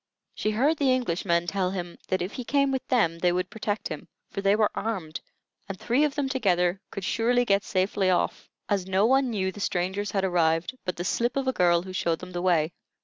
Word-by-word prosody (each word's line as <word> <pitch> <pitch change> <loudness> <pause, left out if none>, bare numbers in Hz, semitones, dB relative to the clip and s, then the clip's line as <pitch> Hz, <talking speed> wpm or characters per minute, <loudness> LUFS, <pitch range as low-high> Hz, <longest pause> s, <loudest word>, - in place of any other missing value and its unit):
She 215 - -1
heard 270 +9 +2
the 275 -3 +3
Englishmen 170 -7 0
tell 185 0 0
him 175 -2 -5
that 185 -1 0
if 185 - -4
he 250 - -5
came 275 +2 +2
with 265 -1 -3
them 170 -10 +2
they 180 +1 +3
would 180 +1 -2
protect 210 -1 -3
him; 155 - -7 0.2
for 195 - -3
they 200 +1 +4
were 215 -1 +2
armed, 185 -8 -4 0.5
and 195 - -4
three 240 +6 +2
of 295 -2 0
them 285 -2 0
together 190 -8 +1
could 195 - -6
surely 245 +5 +2
get 200 -2 +2
safely 190 0 0
off, 180 - 0 0.2
as 195 -3 0
no 190 +2 +3
one 265 +2 +3
knew 190 -4 -1
the 205 - -11
strangers 190 +2 -1
had 195 -2 -1
arrived 170 +2 +1
but 180 - -2
the 175 - -4
slip 240 +7 0
of 270 -1 -1
a 260 - +2
girl 175 -3 +3
who 185 0 -8
showed 170 -2 0
them 180 - -10
the 175 -1 -3
way. 170 -3 +2
195 Hz, 225 wpm, -26 LUFS, 180-235 Hz, 0.5 s, they